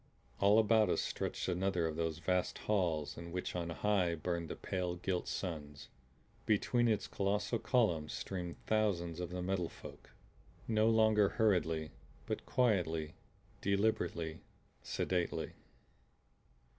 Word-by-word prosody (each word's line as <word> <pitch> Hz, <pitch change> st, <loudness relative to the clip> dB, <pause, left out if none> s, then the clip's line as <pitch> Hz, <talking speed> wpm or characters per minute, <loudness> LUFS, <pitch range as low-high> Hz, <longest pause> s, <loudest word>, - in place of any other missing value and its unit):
All 100 Hz, +2 st, +5 dB
about 110 Hz, -2 st, +5 dB
us -, -, +2 dB
stretched -, -, -3 dB
another 90 Hz, -1 st, +1 dB
of 80 Hz, -1 st, -2 dB
those 80 Hz, -1 st, -1 dB
vast 90 Hz, +2 st, 0 dB
halls 85 Hz, -8 st, 0 dB
in 85 Hz, 0 st, -8 dB
which 90 Hz, +1 st, -3 dB
on 85 Hz, -1 st, -2 dB
high 90 Hz, -1 st, +1 dB
burned 85 Hz, 0 st, -3 dB
the -, -, -4 dB
pale 90 Hz, -2 st, -2 dB
gilt 90 Hz, 0 st, -2 dB
suns. 75 Hz, -6 st, -5 dB, 0.6 s
Between 120 Hz, +3 st, +3 dB
its 105 Hz, -3 st, +1 dB
colossal 100 Hz, +4 st, 0 dB
columns 100 Hz, -, +1 dB
streamed 90 Hz, -3 st, -4 dB
thousands 90 Hz, -6 st, +1 dB
of 90 Hz, -2 st, -3 dB
the 90 Hz, 0 st, -4 dB
Metal 90 Hz, -2 st, -1 dB
Folk; -, -, -12 dB, 0.6 s
no 110 Hz, 0 st, +3 dB
longer 110 Hz, -2 st, +5 dB
hurriedly, 80 Hz, -7 st, +1 dB, 0.3 s
but -, -, -4 dB
quietly, 85 Hz, -10 st, +1 dB, 0.5 s
deliberately, 100 Hz, -5 st, 0 dB, 0.4 s
sedately. 90 Hz, -2 st, -1 dB
90 Hz, 125 wpm, -35 LUFS, 85-105 Hz, 0.6 s, All